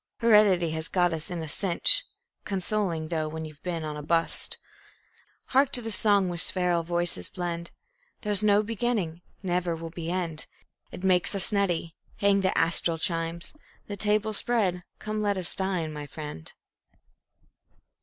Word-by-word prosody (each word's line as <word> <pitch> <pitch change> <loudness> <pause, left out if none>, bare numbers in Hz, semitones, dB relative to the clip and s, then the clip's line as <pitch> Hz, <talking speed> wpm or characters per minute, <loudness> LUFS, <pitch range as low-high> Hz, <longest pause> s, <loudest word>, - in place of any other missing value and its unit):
Heredity 210 -7 +4
has 160 +1 -1
got 175 -2 +1
us 160 -1 -5
in 175 -2 -4
a - - -6
cinch 190 - +4 0.4
(Consoling 190 -4 -2
thought 155 -2 -2
when 160 0 -5
you've 155 -2 -12
been 170 -3 -4
on 155 -1 -4
a 150 - -6
"bust".) 165 +2 -1 0.9
Hark 270 +1 +3
to 245 - +2
the 225 - -4
song 205 -3 +2
where 175 -1 -3
spheral 180 -1 +2
voices 170 - +1
blend: 170 -1 -4 0.5
"There's 210 -3 +3
no 210 0 +4
beginning, 215 -7 -2 0.2
never 175 -2 -1
will 165 0 -7
be 170 -1 -6
end." 170 -4 -2 0.4
It 180 - -9
makes 185 +1 +3
us 195 +3 +3
nutty; 175 -5 0 0.2
hang 200 -1 +3
the 190 - 0
astral 165 0 +3
chimes! 165 +1 -1 0.3
The 205 - -6
tables 210 +1 +1
spread; 200 -7 +1 0.2
come, 215 0 -4
let 205 -1 0
us 180 -2 +2
dine, 180 -5 -2
my 150 -1 -7
friend. 150 - -8
175 Hz, 155 wpm, -27 LUFS, 165-205 Hz, 0.9 s, Heredity